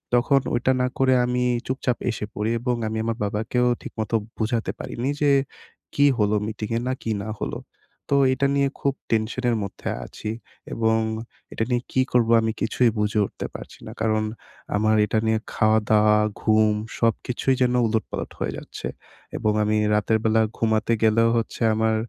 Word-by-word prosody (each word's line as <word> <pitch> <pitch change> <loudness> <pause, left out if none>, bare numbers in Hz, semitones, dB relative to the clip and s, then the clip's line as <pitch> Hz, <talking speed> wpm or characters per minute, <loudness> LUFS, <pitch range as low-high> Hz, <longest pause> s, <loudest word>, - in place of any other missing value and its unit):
তখন 130 +3 +3
ওইটা 125 +2 +2
না 125 - +2
করে 130 -1 +4
আমি 125 0 0 0.2
চুপচাপ 130 -2 -1
এসে 110 - -4
পড়ি। 105 +2 -1
এবং 125 +1 0
আমি 110 0 -3
আমার 115 0 -2
বাবাকেও 110 +4 0
ঠিকমতো 110 0 -3 0.2
বুঝাতে 115 +1 -1
পারিনি 125 +3 -3
যে 145 -1 +4 0.6
কি 140 - +4
হলো 105 -1 +2
মিটিংয়ে? 110 +1 -3
না 130 - +1
কি 115 - -2
না 110 - -6
হলো? - - -3 0.5
তো 140 - +3 0.2
এটা 140 +2 +1
নিয়ে 140 0 +3
খুব 140 - +1 0.2
টেনশনের 115 +2 +1
মধ্যে 100 - -5 0.2
আছি। 110 - -7 0.4
এবং 110 0 +2 0.5
এটা - - -1
নিয়ে 120 -1 +2
কি 130 - +2
করবো, 120 -2 +3
আমি 110 0 0
কিছুই 120 +2 +2
বুঝে 105 +1 +1
উঠতে - - -7
পারছি - - -9
না। - - -6
কারণ, 110 -1 +1 0.5
আমার 110 +1 +3
এটা 110 - 0
নিয়ে 110 0 +2
খাওয়া-দাওয়া, 110 -1 +4 0.2
ঘুম 110 -1 +3 0.2
সবকিছুই 120 +3 +1
যেন 125 -1 +3
উলটপালট 110 0 -3
হয়ে - - -1
যাচ্ছে। - - -7 0.5
এবং 110 - +1
আমি 105 +1 +1 0.2
রাতের 105 +1 +2
বেলা 110 0 +3 0.2
ঘুমাতে 110 0 +1
গেলেও 115 +1 +4
হচ্ছে 115 - -3
আমার 110 0 +2
110 Hz, 165 wpm, -24 LUFS, 110-125 Hz, 0.6 s, করে